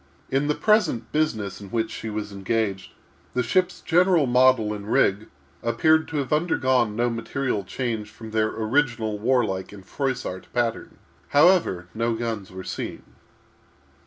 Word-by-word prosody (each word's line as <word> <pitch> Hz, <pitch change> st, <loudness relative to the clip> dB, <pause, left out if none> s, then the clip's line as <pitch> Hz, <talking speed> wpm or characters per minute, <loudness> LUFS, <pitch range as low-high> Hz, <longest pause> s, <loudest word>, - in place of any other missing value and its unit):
In 135 Hz, +2 st, +1 dB
the 150 Hz, -, +1 dB
present 210 Hz, -, +2 dB
business 110 Hz, -12 st, -1 dB
in 100 Hz, -, -9 dB
which 115 Hz, +2 st, -1 dB
she 110 Hz, -, -5 dB
was 105 Hz, -1 st, -4 dB
engaged, 100 Hz, 0 st, -2 dB, 0.4 s
the 125 Hz, -, +2 dB
ship's 180 Hz, +9 st, +1 dB
general 175 Hz, -2 st, +3 dB
model 125 Hz, -3 st, +4 dB
and 105 Hz, +1 st, -6 dB
rig 100 Hz, +3 st, +2 dB, 0.3 s
appeared 155 Hz, +8 st, +3 dB
to 160 Hz, -, -4 dB
have 140 Hz, 0 st, -1 dB
undergone 130 Hz, -9 st, +2 dB
no 120 Hz, +2 st, +1 dB
material 115 Hz, -1 st, -2 dB
change 110 Hz, 0 st, -3 dB
from 110 Hz, +1 st, -11 dB
their 110 Hz, 0 st, +2 dB
original 110 Hz, -2 st, 0 dB
warlike 110 Hz, -6 st, 0 dB
and 100 Hz, -2 st, -12 dB
Froissart 130 Hz, -9 st, -3 dB
pattern. 120 Hz, -2 st, -2 dB, 0.3 s
However, 145 Hz, -, +3 dB
no 115 Hz, +1 st, 0 dB
guns 115 Hz, -4 st, -4 dB
were 95 Hz, 0 st, -7 dB
seen. -, -, -5 dB
115 Hz, 145 wpm, -24 LUFS, 105-135 Hz, 0.4 s, model